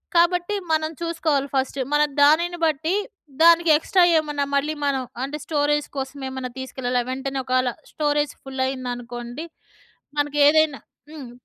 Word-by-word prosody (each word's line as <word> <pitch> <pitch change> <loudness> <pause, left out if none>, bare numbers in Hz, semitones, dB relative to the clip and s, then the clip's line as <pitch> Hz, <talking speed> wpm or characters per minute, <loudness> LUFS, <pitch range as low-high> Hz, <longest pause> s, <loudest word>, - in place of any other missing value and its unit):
కాబట్టి 350 +3 +3 0.2
మనం 315 0 +1
చూసుకోవాలి 320 -4 0
ఫస్ట్. 265 +1 -1 0.2
మన 295 - +4 0.2
దానిని 340 +4 +4
బట్టి 315 +4 0 0.5
దానికి 335 0 +6
ఎక్స్ట్రా 360 +3 +2 0.2
ఏమన్నా 295 -2 -2
మళ్ళీ 295 +2 +1
మనం 270 -2 0 0.2
అంటే 285 +3 -4
స్టోరేజ్ 295 -1 0
కోసం 270 +1 -4
ఏమన్నా 260 -1 -5
తీసుకెళ్ళాలి 250 -1 -2
వెంటనే 270 0 -3
ఒకవేళ 255 -1 +1 0.2
స్టోరేజ్ 295 -1 0
ఫుల్ 265 -1 -4
అయిందనుకోండి. 245 +1 -5 0.7
మనకి 295 0 0
ఏదైనా 310 -2 +3 0.3
హ్మ్. 275 -6 -9
290 Hz, 130 wpm, -23 LUFS, 265-315 Hz, 0.7 s, దానికి